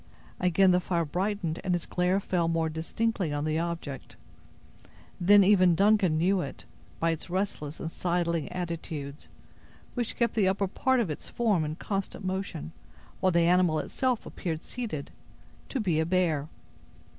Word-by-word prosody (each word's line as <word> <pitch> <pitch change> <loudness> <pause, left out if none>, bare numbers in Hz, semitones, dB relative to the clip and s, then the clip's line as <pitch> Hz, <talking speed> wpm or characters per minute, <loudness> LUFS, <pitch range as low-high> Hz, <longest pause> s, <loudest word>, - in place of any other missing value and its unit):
Again 185 +1 +4
the 180 - +4
fire 170 -2 0
brightened 180 0 -2
and 180 -1 +1
its 175 - -3
glare 180 +2 +1
fell 175 -4 0
more 165 -1 +1
distinctly 175 +3 -1
on 145 +1 -1
the 155 +1 0
object. 165 -5 -5 1.0
Then 200 +3 +7
even 185 -3 +5
Duncan 200 -3 +4
knew 185 +3 +2
it, - - -7 0.3
by 165 0 +2
its 165 +2 -5
restless 175 -5 -3
and 165 - -4
sidling 170 -3 -1
attitudes, 165 -5 -5 0.6
which 240 -3 -2
kept 235 -1 +1
the 205 -4 +2
upper 195 +1 +1
part 260 +7 +1
of 190 -9 -1
its 150 - -6
form 215 -8 +1
in 155 0 -3
constant 195 +1 -4
motion, 185 -4 -3 0.5
while 185 - +3
the 170 0 +3
animal 175 -1 +4
itself 250 - -1
appeared 165 -2 -4
seated, 215 - -5 0.6
to 270 - -2
be 175 -8 +1
a 160 - +2
bear. 170 -5 +1
180 Hz, 155 wpm, -28 LUFS, 160-195 Hz, 1.0 s, Then